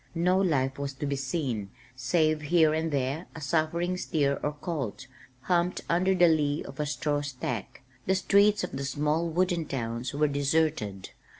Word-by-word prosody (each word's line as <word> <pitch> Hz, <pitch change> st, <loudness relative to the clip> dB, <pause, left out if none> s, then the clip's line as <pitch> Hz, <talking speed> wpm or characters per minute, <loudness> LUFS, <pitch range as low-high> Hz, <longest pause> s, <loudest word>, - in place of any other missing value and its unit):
No 180 Hz, +3 st, +3 dB
life 140 Hz, -8 st, +1 dB
was 140 Hz, -1 st, -3 dB
to 145 Hz, -, -4 dB
be 140 Hz, 0 st, -1 dB
seen 130 Hz, -7 st, -2 dB, 0.3 s
save 155 Hz, +4 st, +1 dB
here 160 Hz, 0 st, +3 dB
and 160 Hz, +1 st, 0 dB
there 140 Hz, +4 st, -1 dB
a -, -, -6 dB
suffering 170 Hz, +4 st, 0 dB
steer 140 Hz, -5 st, 0 dB
or 150 Hz, -, -1 dB
colt, 145 Hz, -, -4 dB, 0.4 s
humped 175 Hz, +3 st, +1 dB
under 185 Hz, +3 st, +2 dB
the 175 Hz, -1 st, +6 dB
lee 150 Hz, -2 st, +1 dB
of 135 Hz, -, -11 dB
a 150 Hz, -, 0 dB
straw 150 Hz, 0 st, -1 dB
stack. 125 Hz, -6 st, -5 dB, 0.2 s
The 190 Hz, -, +3 dB
streets 200 Hz, +2 st, +4 dB
of 180 Hz, -, -3 dB
the 140 Hz, -, -4 dB
small 150 Hz, +4 st, 0 dB
wooden 175 Hz, 0 st, 0 dB
towns 120 Hz, -2 st, -3 dB
were 150 Hz, +1 st, +3 dB
deserted. 140 Hz, -9 st, 0 dB
150 Hz, 170 wpm, -28 LUFS, 140-170 Hz, 0.4 s, the